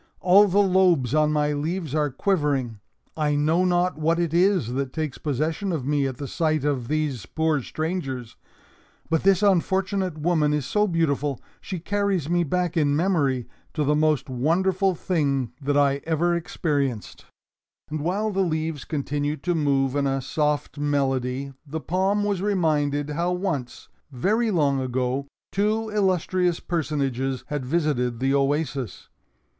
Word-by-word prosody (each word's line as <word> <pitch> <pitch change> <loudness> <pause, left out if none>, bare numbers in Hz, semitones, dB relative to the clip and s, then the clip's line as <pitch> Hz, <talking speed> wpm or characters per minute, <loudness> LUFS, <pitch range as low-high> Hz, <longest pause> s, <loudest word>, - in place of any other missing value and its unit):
"All 195 +3 +6
the 195 +1 0
lobes 180 - +3
on 155 0 +3
my 150 -1 +1
leaves 155 +1 -3
are 150 -1 +1
quivering. 140 - 0 0.4
I 150 -2 +1
know 155 +5 +2
not 180 -2 +1
what 165 +2 +2
it 170 -2 -1
is 175 - +2
that 135 0 -2
takes 155 -4 -3
possession 155 +7 -1
of 155 -7 -2
me 145 -1 +1
at 130 -2 -5
the 140 - -5
sight 155 -1 0
of 135 -5 -1
these 150 -4 -2
poor 160 -2 0
strangers. 135 -6 -4 0.8
But 160 - +2
this 195 +1 +3
unfortunate 190 -2 +1
woman 155 -2 +1
is 145 -3 -2
so 210 +10 +1
beautiful! 150 -6 0 0.2
She 185 - -5
carries 195 -2 -1
me 175 0 +3
back, 180 +2 -1
in 145 -3 +2
memory, 145 -8 +1 0.3
to 155 - +1
the 150 +1 +2
most 155 -1 +2
wonderful 180 +9 +1
thing 140 - 0
that 145 +1 0
I 140 -1 +3
ever 165 +2 +1
experienced." 145 - -2 0.7
And 155 - -2
while 195 +8 -1
the 195 - -2
leaves 160 -4 -2
continued 145 -1 -2
to 175 - +1
move 140 -4 +1
in 140 -1 +1
a 135 0 0
soft 150 +2 -1
melody, 135 -2 -1
the 155 +1 -5
palm 190 +6 0
was 200 -3 -1
reminded 150 -7 0
how 170 +4 0
once, 170 -9 -3 0.2
very 215 - +1
long 145 -8 +2
ago, 130 +2 -1 0.2
two 215 +2 0
illustrious 185 -3 +1
personages 135 -6 -2
had 145 -2 -2
visited 130 -6 0
the 135 +1 +1
oasis. 140 -3 -1
155 Hz, 150 wpm, -24 LUFS, 140-180 Hz, 0.8 s, All